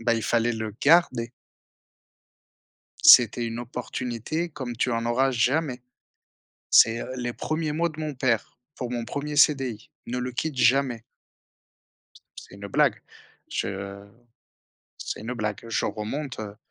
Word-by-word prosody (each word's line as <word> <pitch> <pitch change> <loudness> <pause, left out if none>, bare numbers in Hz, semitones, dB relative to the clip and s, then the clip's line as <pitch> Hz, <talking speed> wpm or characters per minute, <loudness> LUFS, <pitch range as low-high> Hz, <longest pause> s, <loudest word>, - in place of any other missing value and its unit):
bah, 115 0 +2
il 115 - -2
fallait 120 0 +1
le 110 -2 -5
garder. 140 -7 +4 1.7
C'était 120 0 +7
une 115 +1 -4
opportunité 125 +6 -4
comme 130 -5 -6
tu 125 - 0
en 115 0 -1
auras 130 +3 +2
jamais. 130 +2 0 0.9
C'est, 115 +1 +5
heu, - - -6
les 120 -1 -3
1ers 155 -1 -2
mots 170 +2 0
de 155 0 -11
mon 155 -1 -3
père 125 -4 -1 0.2
pour 125 - -5
mon 120 -1 -2
1er 145 +4 -4
CDI: 135 -7 +2 0.2
«Ne 125 +1 -2
le 125 0 -3
quitte 150 +3 -3
jamais». 125 -2 +2 1.4
C'est 100 - -11
une 100 0 -8
blague. - - +2 0.5
Je 100 +1 -5 0.9
c'est - - -5
une 120 +3 -5
blague, 105 -2 -3
je - - -1
remonte, 120 +6 -4
heu 110 - -4
heu, 100 - -17
120 Hz, 145 wpm, -25 LUFS, 115-140 Hz, 1.7 s, C'était